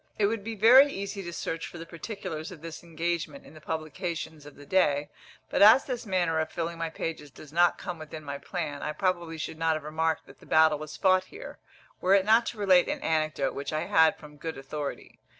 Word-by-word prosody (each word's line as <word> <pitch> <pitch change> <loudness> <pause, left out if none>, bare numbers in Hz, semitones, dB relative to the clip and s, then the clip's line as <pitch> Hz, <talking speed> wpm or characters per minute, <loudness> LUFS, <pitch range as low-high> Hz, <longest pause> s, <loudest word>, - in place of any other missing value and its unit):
It 210 - +3
would 210 0 -1
be 225 +1 -5
very 255 +7 +7
easy 200 -1 -5
to 175 -2 -6
search 165 -1 -4
for - - -10
the 165 - -7
particulars 165 -2 -6
of 165 -4 -12
this 165 -1 -7
engagement 170 - -3
in - - -14
the 155 - -14
publications 160 -1 -5
of 145 - -13
the 145 - -13
day; 145 -5 +2 0.4
but - - +1
as 220 +6 +8
this 245 -4 -4
manner 175 -4 +1
of 160 0 -1
filling 170 0 -4
my 165 -1 -2
pages 160 -2 -5
does 145 +2 -14
not 175 +1 +4
come 180 -3 -6
within 155 0 -8
my 140 -1 -5
plan, 155 -5 -4
I 150 - -3
probably 175 -1 -1
should 160 0 -5
not 165 -1 +2
have 155 - -5
remarked 160 +1 -1
that - - -17
the - - -17
battle 155 -1 +4
was 155 0 -8
fought 185 -1 +3
here, 435 - -10 0.4
were 190 +2 +5
it 195 -1 +3
not 225 +2 +4
to 235 - -4
relate 190 -4 +4
an - - -3
anecdote 155 -3 0
which 140 - -5
I 155 0 -1
had 160 0 +4
from 150 -1 -14
good 160 +1 -5
authority. 140 +2 -6
165 Hz, 225 wpm, -28 LUFS, 155-190 Hz, 0.4 s, as